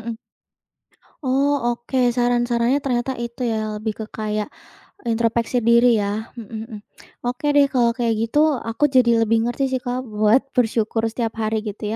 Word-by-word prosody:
mhm. 230 -1 -4 1.1
Oh, 280 +2 +2 0.2
oke, 245 0 0
saran-sarannya 240 +1 +1
ternyata 265 -2 -1
itu 235 +2 -5
ya, 215 -1 -2
lebih 215 +1 -3
ke 220 - -4
kayak 215 -1 -3 0.6
introspeksi 230 +1 0
diri 235 0 +5
ya. 210 +2 -3
Mhm 225 -3 -9 0.2
mhm. 225 -3 -9 0.5
Oke 250 +4 -3
deh 285 -1 +6
kalau 240 -2 +4
kayak 230 -2 +1
gitu, 230 +6 0 0.2
aku 230 +5 -2
jadi 255 -3 +3 0.2
lebih 225 +1 +2
ngerti 245 +3 -1
sih 260 -1 -1
Kak, 250 +1 -3
buat 215 +3 +3
bersyukur 225 -2 +1
setiap 230 0 -3
hari 220 0 0
gitu 210 +1 -6
235 Hz, 155 wpm, -21 LUFS, 220-250 Hz, 1.1 s, deh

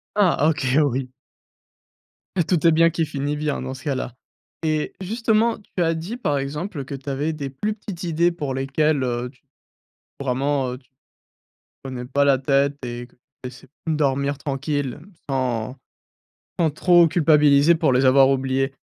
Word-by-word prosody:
Ah, 180 -7 +3
OK, 155 -3 -1 0.2
oui. 130 -2 -1 1.3
Et 170 - +4
tout 175 0 0
est 165 - +7
bien 165 +1 +5
qui 165 -1 -1
finit 145 0 -3
bien, 150 -2 -2
dans 130 0 -5
ce 130 - -11
cas-là 135 -5 -3 0.5
et 155 -1 -1
justement, 225 +3 +1 0.2
tu 180 - 0
as 165 0 +1
dit 185 +10 -5
par 145 - 0
exemple 145 +2 -4
que 140 - -7
tu 135 +1 -7
avais 145 +4 -1
des 140 -3 -5
plus 210 +11 -3
petites 200 -4 -8
idées 170 0 +2
pour 145 -5 -4
lesquelles, 140 +2 +1
heu, 125 0 -2
tu 130 - -29 0.8
vraiment, 135 0 0
heu, 125 - -7
tu 130 - -32 0.9
prenais 130 -2 -6
pas 140 +3 +1
la 140 -2 +4
tête 140 +1 +1
et 120 +1 -6
que - - -29 0.3
essai 125 +1 -9 0.2
dormir 140 -2 0
tranquille 145 -1 -3 0.3
sans 125 -3 -1 0.8
sans 165 -3 +3
trop 175 +2 +5
culpabiliser 150 -1 +5
pour 160 -4 +2
les 130 +1 +3
avoir 135 +1 +6
oubliées. 135 0 0
140 Hz, 160 wpm, -22 LUFS, 135-160 Hz, 1.3 s, est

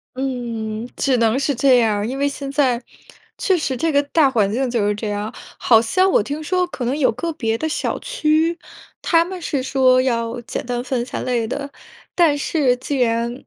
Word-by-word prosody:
嗯， 235 -4 -4
只 270 -2 +2
能 230 +3 +2
是 280 -1 0
这 260 0 +4
样 220 -3 +2
儿。 205 - -2
因 265 +2 -4
为 285 - +2
现 275 -1 -5
在， 260 -4 +1 0.6
确 395 -8 +2
实 265 -5 -2
这 325 +3 0
个 285 0 +3
大 285 -1 +3
环 210 -6 +1
境 255 +2 -1
就 230 -4 0
是 205 - +1
这 210 +1 -5
样。 205 +3 -3 0.2
好 225 -2 +5
像 370 +11 +2
我 - - +4
听 290 +7 -5
说 365 +2 0
可 260 - -6
能 260 +5 -1
有 280 - +3
个 330 +8 -3
别 225 -6 -1
的 315 +4 -2
小 - - -2
区， 330 -7 0 0.4
它 330 -1 +3
们 365 0 -7
是 275 -5 -2
说 255 -1 +3
要 235 -1 -1
简 235 - -5
单 245 0 -3
分 250 -3 -2
三 - - -5
类 240 -3 -1
的， 280 +3 -5 0.4
但 320 -5 +3
是 275 -4 +1
既 265 +2 -4
然 235 0 +1
260 Hz, 225 characters per minute, -20 LUFS, 235-295 Hz, 0.6 s, 好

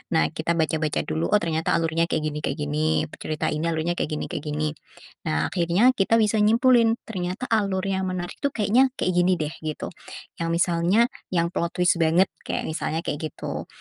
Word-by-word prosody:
Nah, 160 - +3
kita 165 +1 -1
baca-baca 155 -1 0
dulu. 160 +1 -1
Oh, - - +3
ternyata 160 -1 0
alurnya 165 0 +1
kayak 160 -2 -1
gini 150 -1 -2
kayak 145 -1 -3
gini. 155 +2 +1
Pe - - -9
cerita 155 -1 -2
ini 155 +2 -1
alurnya 165 +1 0
kayak - - 0
gini - - -3
kayak 145 - -4
gini. 150 +1 -1 0.6
Nah, 75 +1 0
akhirnya 180 +8 +3
kita 225 -2 +2
bisa 220 -1 +3
nyimpulin, 230 +1 +4
ternyata 185 0 -4
alur 200 -4 +1
yang 190 -1 -1
menarik 180 -1 -4
itu 280 - +1
kayaknya 230 +5 +4
kayak 185 - 0
gini 180 +1 +4
deh, 155 -3 -3
gitu. 155 -1 -5 0.5
Yang 165 0 -1
misalnya, 170 +4 +2 0.3
yang 170 -1 +1
plot 170 -1 -2
twist 180 -1 +3
banget. 165 +3 +3 0.2
Kek - - -2
misalnya 160 +1 -3
kek 145 - -3
gitu. 155 -1 -5
170 Hz, 190 wpm, -24 LUFS, 155-195 Hz, 0.6 s, nyimpulin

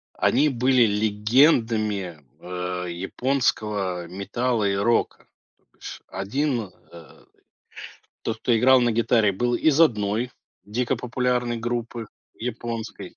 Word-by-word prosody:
они 150 - +3
были 130 -1 +3
легендами, 105 - +2 0.2
э, 90 0 -4
японского, 100 -2 -1
э, - - -11
метала 110 +3 -1
и 100 - 0
рока, 115 +4 0 0.3
то - - -40
бишь - - -10
1, 115 +2 -2 0.2
э, 85 -2 -15 1.0
тот, 110 0 -3
кто 115 0 +1
играл 130 +3 +5
на 120 -1 +2
гитаре, 110 -2 +2
был 120 +5 0
из 155 +4 +2
1 110 -4 +2 0.3
дико 115 +4 -1
популярной 125 -1 -1
группы 120 -1 -4 0.3
японской. 115 -1 -6
115 Hz, 115 wpm, -24 LUFS, 100-125 Hz, 1.0 s, играл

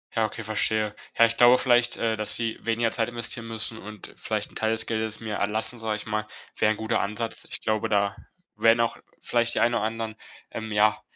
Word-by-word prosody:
Ja, 110 -1 +2
okay, 110 - -8
verstehe. 110 0 0 0.2
Ja, 115 - +7
ich 115 0 -1
glaube 120 +1 +7
vielleicht, 120 -2 +2
äh, 115 -1 0
dass 105 -1 +1
sie 115 -1 -2
weniger 115 0 0
Zeit 115 0 -1
investieren 120 0 +1
müssen 110 0 -3
und 105 -1 -10
vielleicht - - -3
'n - - -19
Teil 110 - 0
des 110 0 +2
Geldes 110 -1 -2
mir 110 -2 -4
erlassen, 110 +4 +1
sage 110 -1 -1
ich 105 - -6
mal, 110 0 -2 0.3
wäre 110 - +2
ein 110 - -2
guter 110 +1 -1
Ansatz. 110 +3 -3
Ich - - -3
glaube, 110 -1 0
da 100 -1 +1 0.4
wären 115 +1 +4
auch 115 0 +1 0.3
vielleicht 120 -1 +2
die - - +1
einen 120 +1 +3
oder 115 -3 0
anderen, 110 0 -3 0.4
ähm, 110 -1 -6
ja, 105 0 +3
110 Hz, 220 wpm, -26 LUFS, 110-115 Hz, 0.4 s, Ja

